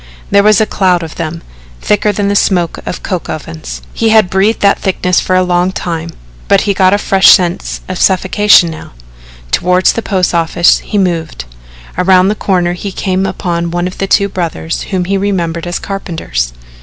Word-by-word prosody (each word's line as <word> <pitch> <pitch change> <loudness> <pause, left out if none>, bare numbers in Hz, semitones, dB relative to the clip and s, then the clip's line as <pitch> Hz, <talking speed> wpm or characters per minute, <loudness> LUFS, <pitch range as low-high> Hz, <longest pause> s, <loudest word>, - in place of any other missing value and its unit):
There 200 0 +5
was 210 0 +4
a 220 - +3
cloud 185 -4 +1
of 160 - -7
them 165 0 -5 0.4
thicker 210 0 +1
than 205 0 -2
the 200 - 0
smoke 175 -4 +1
of - - -5
coke 185 -4 -4
ovens. 80 - -7
He 225 - 0
had 220 -4 +4
breathed 195 +4 +1
that 200 0 +3
thickness 180 -1 0
for 185 - -1
a 185 - +3
long 180 +1 +1
time, 170 -3 -4 0.4
but - - +4
he 200 - 0
got 185 -1 +3
a 205 - +3
fresh 195 -2 +2
sense 180 -2 +2
of 185 -1 -5
suffocation 190 -1 +3
now. 155 - -10 0.6
Toward 180 +1 +1
the 230 - +3
post 185 -5 -1
office 170 +1 +2
he 210 - -4
moved. 165 - -2 0.5
Around 185 +1 +4
the - - +1
corner 180 -4 0
he 195 +3 -6
came 190 0 -1
upon 170 -2 -3
one 175 +1 -2
of 180 - -5
two 200 +1 +2
brothers 170 -3 -4
whom 185 -3 -1
he 195 +1 -1
remembered 175 -4 -2
as 175 - -2
carpenters. 160 - -4
185 Hz, 185 wpm, -12 LUFS, 170-195 Hz, 0.6 s, There